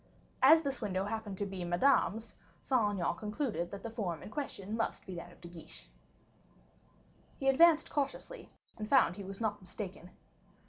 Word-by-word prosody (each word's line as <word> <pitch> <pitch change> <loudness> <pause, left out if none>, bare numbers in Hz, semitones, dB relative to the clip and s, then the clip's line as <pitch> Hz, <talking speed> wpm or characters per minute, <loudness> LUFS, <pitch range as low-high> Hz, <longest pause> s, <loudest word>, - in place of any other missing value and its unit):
As 315 +5 +8
this 275 -2 -3
window 195 -3 -1
happened 210 -2 -4
to 205 - -1
be 190 -2 -5
Madame's, 220 +4 +2 0.3
Saint 225 -6 +2
Aignan 175 - +1
concluded 210 - -2
that 200 +1 -8
the 230 - -5
form 180 -9 -3
in - - -9
question 215 -6 -4
must 225 - -2
be 190 - -7
that 175 0 -7
of - - -18
De 175 - -9
Guiche. 170 - -11 1.5
He 270 - -2
advanced 315 +4 +6
cautiously, 290 - -3 0.3
and 215 -1 -5
found 260 -11 +5
he 200 - -7
was 195 +1 -7
not 210 -3 -1
mistaken. 185 -1 -7
210 Hz, 170 wpm, -33 LUFS, 185-260 Hz, 1.5 s, As